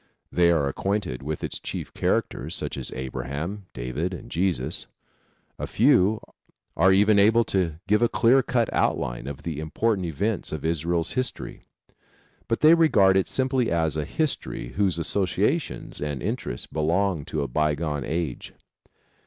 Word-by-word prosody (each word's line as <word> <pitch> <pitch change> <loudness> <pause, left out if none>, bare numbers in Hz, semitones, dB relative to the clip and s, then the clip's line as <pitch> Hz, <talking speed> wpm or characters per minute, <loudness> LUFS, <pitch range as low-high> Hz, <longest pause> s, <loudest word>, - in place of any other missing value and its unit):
They 85 -1 +4
are 80 -5 +2
acquainted 95 -3 -2
with 75 +2 -4
its - - -3
chief - - -6
characters - - -1
such - - -2
as 65 -3 -5
Abraham, 70 +10 -5
David 75 +10 -3
and - - -11
Jesus. 90 0 -1 0.7
A - - -3
few 110 -4 +4 0.6
are 95 +4 +5
even 105 +2 +5
able 110 +3 +5
to 90 -7 0
give 105 +2 +2
a 120 - +4
clear 130 +4 +4
cut 120 -3 +1
outline - - 0
of 70 0 -7
the 80 -3 -4
important 95 +4 0
events 100 +7 -2
of 80 0 -5
Israel's 85 +1 +1
history; 130 -1 -4 0.9
but 115 - -1
they 155 +2 +8
regard 105 - +5
it 95 - +2
simply 130 -2 0
as 80 -2 +1
a 75 - -1
history 140 - -2
whose 95 +1 0
associations 90 +3 -1
and 75 -4 -3
interests - - -3
belong 80 +2 0
to 80 -3 -2
a - - -2
bygone 75 +1 -1
age. 80 -2 -4
85 Hz, 150 wpm, -25 LUFS, 75-105 Hz, 0.9 s, they